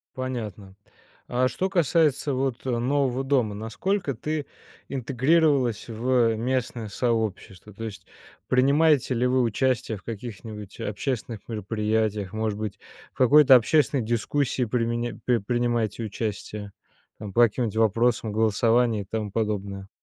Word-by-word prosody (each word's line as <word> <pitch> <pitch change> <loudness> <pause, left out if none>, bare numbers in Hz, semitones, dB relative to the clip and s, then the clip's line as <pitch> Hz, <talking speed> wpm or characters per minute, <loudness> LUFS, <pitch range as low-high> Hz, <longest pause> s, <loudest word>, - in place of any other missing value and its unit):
Понятно. 110 -7 -5 0.5
А 125 +1 +1
что 190 +8 -2
касается 160 -5 +2
вот, 130 -1 -2
э, - - -1
нового 130 +1 0
дома- 130 -7 +1
насколько 140 - -2
ты 150 +5 -3 0.4
интегрировалась 135 -1 +1
в 115 0 +1
местное 120 -1 -2
сообщество? 105 -4 -2
То 115 +3 -7
есть 100 -4 -8 0.4
принимаете 140 +1 +3
ли 125 +1 +1
вы 130 +1 +2
участие 120 -1 0
в 95 - -17
каких-нибудь 110 -2 -8
общественных 115 +1 -3
мероприятиях, 105 -1 -1
может 110 -1 -2
быть, 105 -2 -5 0.3
в - - -31
какой-то 135 +1 +7
общественной 135 +1 +3
дискуссии 120 +4 0
применя 120 0 -1
при 125 -2 +3
принимаете 120 0 -1
участие, 105 -1 -5 0.5
ну, 105 -2 -7
по 120 +5 +5
каким-нибудь 115 -1 0
вопросам 115 0 +2
голосования 115 +1 +2
и - - -8
тому 105 0 -4
подобное? 100 -3 -3
115 Hz, 125 wpm, -25 LUFS, 105-130 Hz, 0.5 s, какой-то